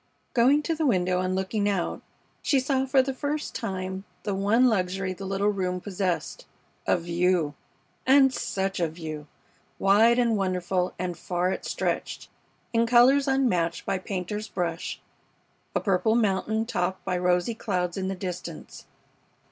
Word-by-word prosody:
Going 270 +5 +4
to 330 - 0
the 315 -1 0
window 180 -5 +2
and 185 0 -1
looking 200 +2 0
out, 190 -4 -1 0.4
she 275 - +2
saw 265 0 0
for 265 0 +4
the 270 0 -3
first 295 +3 -3
tune 190 -3 -4 0.2
the 205 - -1
one 205 +6 +3
luxury 190 -4 0
the 195 +1 -7
little 195 +2 +1
room 185 -3 -1
possessed 190 - -3 0.4
a - - +4
view! 170 -2 +1 0.5
And 270 0 +6
such 195 -7 -2
a 170 - +2
view! 155 -2 -7 0.5
Wide 220 +5 +5
and 235 -2 +3
wonderful 185 -2 -1
and 180 -1 -3
far 180 +1 -1
it - - -4
stretched, - - -3 0.4
in 230 0 +3
colors 255 +4 +5
unmatched 210 -12 +1
by 190 - -1
painter's 200 +3 -4
brush, 175 -3 -3 0.8
a - - +3
purple 205 +3 +2
mountain 220 0 +1
topped 185 -5 -2
by 185 - 0
rosy 180 +4 +1
clouds 180 -6 -2
in 190 -1 -2
the 195 - -2
distance. 180 -3 -7
195 Hz, 150 wpm, -26 LUFS, 180-235 Hz, 0.8 s, And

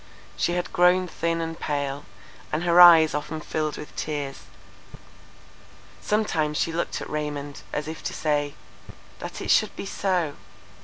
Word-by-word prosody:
She 175 - 0
had 180 0 -3
grown 180 +1 +4
thin 165 0 -2
and 165 0 -5
pale; 145 -1 -3 0.5
and 155 +3 -1
her 175 0 +6
eyes 165 -3 +9
often 150 +1 -3
filled 155 0 -3
with 150 - -10
tears. 145 -3 -4 1.6
Sometimes 160 -8 0
she 165 - 0
looked 170 - -2
at - - -6
Raymond, 145 -1 -4
as 150 0 -3
if 160 0 -6
to - - -2
say—That 145 -2 -5
it - - 0
should - - +3
be - - -6
so! 180 -6 -1
155 Hz, 145 wpm, -25 LUFS, 150-175 Hz, 1.6 s, eyes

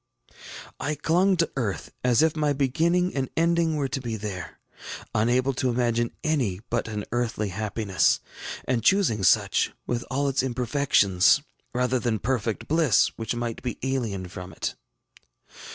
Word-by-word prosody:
I 150 +2 -1
clung 180 +6 +2
to 165 -1 +1
earth 115 -8 -3
as 125 +1 +4
if 160 -1 +2
my 150 -2 +1
beginning 165 +7 +1
and 135 -2 -2
ending 165 -1 +2
were 145 -2 0
to 135 - -3
be 115 -3 -3
there, 100 -4 -6 0.6
unable 125 +5 +2
to 130 0 0
imagine 120 -1 +1
any 130 -13 0
but 120 -1 0
an 105 -2 -4
earthly 115 -3 -1
happiness, 105 0 +1 0.5
and 125 -4 0
choosing 185 - +3
such, 95 - +3
with 120 0 -2
all 140 +2 0
its 135 -1 +1
imperfections, 125 -4 +3 0.3
rather 125 +1 +1
than 115 -2 0
perfect 115 0 -2
bliss 160 -6 +4
which 115 +1 -3
might 120 -1 -3
be 125 - -4
alien 115 -9 -2
from 90 +1 -8
it. - - -3
125 Hz, 150 wpm, -26 LUFS, 110-145 Hz, 0.6 s, as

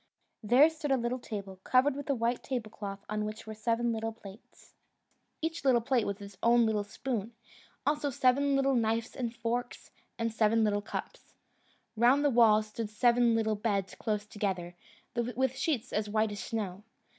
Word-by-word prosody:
There 250 +8 +6
stood 310 -2 -5
a 270 - +4
little 240 +1 -2
table, 200 -5 -7
covered 260 +2 +3
with 285 0 -7
a 280 - +2
white 235 +1 0
tablecloth, 210 -5 -5
on 215 0 -2
which 215 0 -6
were 220 - -6
seven 230 +2 0
little 225 0 -2
plates 200 0 -15 0.7
(each 325 -1 -2
little 260 -3 +5
plate 240 -1 +1
with 200 +1 -3
its 200 -1 -12
own 235 0 +5
little 215 -2 +1
spoon) 225 +1 -4 0.5
also 295 -1 +1
seven 275 +2 +2
little 275 0 +2
knives 225 -1 0
and 240 -3 -2
forks, 235 +1 -3 0.3
and 230 -1 -1
seven 225 0 +3
little 205 -1 +1
cups. - - -7 0.6
Round 250 +6 +4
the 290 - +4
walls 220 -3 +5
stood 215 0 -5
seven 235 +2 +3
little 220 -1 +1
beds 205 -3 -1
close 210 -1 -2
together, 190 -5 -3 0.4
with 245 +2 0
sheets 255 -6 -1
as 210 0 -1
white 215 0 +1
as 205 - -6
snow. 200 -4 -4
230 Hz, 170 wpm, -30 LUFS, 210-250 Hz, 0.7 s, There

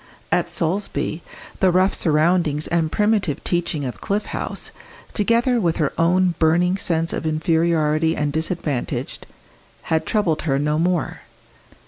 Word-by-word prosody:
At - - +1
Solesby 175 -1 -2 0.4
the 190 - +4
rough 185 +2 +3
surroundings 155 -1 +2
and 165 -2 0
primitive 210 -8 +1
teaching 170 -4 -1
of 125 - -6
Cliff 205 +1 -1
House, - - -4 0.4
together 235 +3 +2
with 170 -4 +1
her 150 -4 0
own 180 +2 +3
burning 175 +3 +3
sense 165 -3 -1
of 160 - -2
inferiority 160 0 +1
and 145 -1 -1
disadvantage, 160 -4 -2 0.6
had 160 -1 -1
troubled 190 -8 +1
her 135 -4 0
no 150 +2 0
more. 175 -1 0
165 Hz, 130 wpm, -21 LUFS, 155-185 Hz, 0.6 s, the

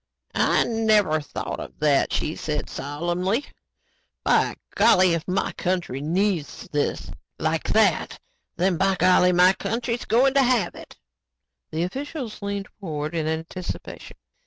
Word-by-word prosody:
"I - - +3
never 215 -8 +2
thought 145 - -5
of - - -9
that," 150 -2 +2
she 155 - -1
said 150 -1 -3
solemnly. 175 - -2 0.8
"By - - +2 0.2
golly, 185 -1 +5
if 165 -1 -3
my 190 +1 0
country 175 -7 -2
needs 170 0 -1
this 145 -1 -1 0.3
like - - -1
that, - - +2 0.4
then 180 0 +2
by 195 +1 +2
golly, 180 0 +4
my 180 +1 +5
country's 235 +3 -3
going 260 +4 +3
to 275 - +5
have 245 -8 +2
it." - - -13 0.7
The 160 +2 -2
officials 255 - -5
leaned 200 -1 -3
forward 155 -4 -4
in 160 -2 -1
anticipation. 160 +3 -6
180 Hz, 135 wpm, -24 LUFS, 160-210 Hz, 0.8 s, golly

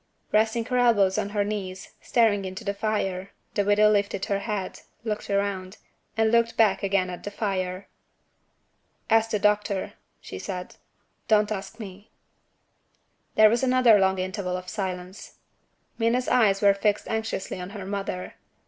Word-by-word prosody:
Resting 220 +2 +2
her 250 +1 0
elbows 205 -6 +3
on 200 - -2
her 205 0 0
knees, 195 -3 -5
staring 220 -4 +2
into 190 0 -6
the 200 - -1
fire, 200 -3 -2 0.2
the 205 - +1
widow 210 +1 +4
lifted 200 -2 0
her 200 -2 -1
head 200 -3 -4 0.2
looked 215 -2 -4
round 200 -1 -2 0.4
and 220 0 +3
looked 230 0 +2
back 215 -4 +3
again 195 -2 0
at 175 - -7
the - - -4
fire. 190 -2 -3 1.2
"Ask 225 0 +4
the 220 - 0
doctor," 210 -1 0 0.3
she 95 - -8
said. 180 - -6 0.5
"Don't 215 -1 +3
ask 205 +2 -5
me." 200 -1 -10 1.3
There 215 0 +8
was 235 - +1
another 255 -4 +5
long 190 0 +2
interval 185 0 -3
of 180 0 -8
silence. 185 -2 -5 0.6
Minna's 235 +2 +1
eyes 210 -5 +3
were 200 -1 +7
fixed 205 +1 0
anxiously 220 -4 -3
on 180 - -6
her 200 -2 -7
mother. 195 -2 -4
205 Hz, 150 wpm, -25 LUFS, 190-220 Hz, 1.3 s, There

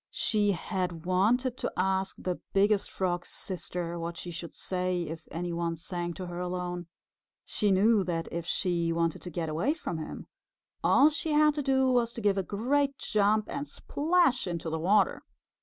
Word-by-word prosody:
She 205 -2 +1
had 175 -2 -3
wanted 235 +8 +2
to - - -2
ask 190 +1 +1
the 180 -1 -3
Biggest 200 +1 +3
Frog's 175 -2 -2
Sister 175 -2 -4
what 170 0 -4
she 175 - -6
should 170 0 -7
say 180 -1 -1
if 160 0 -7
any 175 +1 -3
one 170 0 -1
sang 175 +1 -4
to 185 - -5
her 175 0 -6
alone. 180 -1 -3 0.6
She 210 - +1
knew 200 +2 +4
that 165 -2 -2
if 170 0 -4
she 170 -3 0
wanted 165 -1 0
to 180 - -6
get 165 -1 -3
away 165 - 0
from 175 - -4
him, 155 - -6 0.6
all 290 +3 +6
she 310 +1 -2
had 300 0 +5
to 295 - -2
do 265 -1 +3
was 240 -2 +2
to 230 - -6
give 200 -2 +2
a - - +2
great 270 +9 0
jump 210 +1 +2
and 285 +1 -4
splash 300 - +1
into 170 -2 -3
the 160 - -1
water. 195 +5 +3
185 Hz, 180 wpm, -29 LUFS, 170-225 Hz, 0.6 s, all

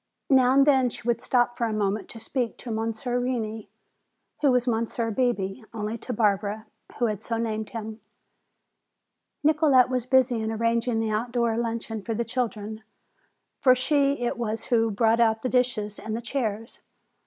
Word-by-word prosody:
Now 260 -1 +5
and 275 0 +6
then 265 -4 +4
she 240 - -9
would 235 -1 +1
stop 240 -1 +1
for 235 - +2
a 220 - -2
moment 205 -1 -1
to 230 - -9
speak 240 +1 -3
to 240 - -7
Monsieur 225 +3 -2
Reney, 225 -4 -3 0.7
who 290 - +4
was 250 0 +1
Monsieur 230 0 -1
Bebé 225 -3 -1
only 215 +1 -3
to 250 - -6
Barbara, 210 -1 0 0.3
who 240 - +1
had 210 -3 -2
so 230 +1 -3
named 220 -2 -2
him. 220 -1 -7 1.4
Nicolete 295 -5 +4
was 255 -1 -2
busy 255 -3 +3
in 220 0 -2
arranging 230 +1 0
the 220 -1 -1
outdoor 235 +1 0
luncheon 230 -1 -3
for 225 +2 -3
the 235 +2 -1
children. 220 -3 -3 0.8
For 255 -1 +5
she 280 0 +1
it 240 - -2
was 225 -1 -2
who 230 -3 +2
brought 225 +2 +2
out 225 -1 +2
the 255 - 0
dishes 240 -5 0
and 220 0 -4
the - - -5
chairs. 225 -3 -3
230 Hz, 170 wpm, -26 LUFS, 220-250 Hz, 1.4 s, and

